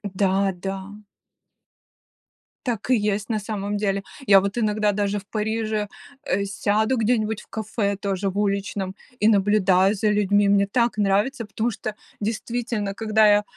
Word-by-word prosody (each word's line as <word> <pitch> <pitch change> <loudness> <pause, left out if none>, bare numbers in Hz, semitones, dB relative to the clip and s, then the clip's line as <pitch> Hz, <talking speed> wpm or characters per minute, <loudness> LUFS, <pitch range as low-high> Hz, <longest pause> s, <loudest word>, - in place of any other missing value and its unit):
Да, 195 0 +2
да. 195 +3 -6 1.6
Так 235 -2 -3
и - - +6
есть 210 -1 -1
на 220 -2 0
самом 205 -1 -3
деле. 200 -1 -1 0.2
Я 195 -1 +8
вот 200 +3 -3
иногда 210 -2 +2
даже 205 0 -1
в 195 - -16
Париже, 215 0 -2 0.4
э, 200 +2 0
сяду 215 +5 +1
где-нибудь 220 -2 +1
в - - -19
кафе 215 -2 -2
тоже 195 0 -2
в 195 - -6
уличном 200 -1 -1 0.2
и 210 - +3
наблюдаю 195 -2 +4
за 210 +1 +1
людьми. 205 0 +3
Мне 200 0 +4
так 235 +2 +1
нравится, 210 +5 +1
потому 220 +3 -2
что 215 +1 -5 0.2
действительно, 220 -1 -2
когда 220 0 +3
я, 205 0 +5
205 Hz, 150 wpm, -23 LUFS, 200-220 Hz, 1.6 s, Я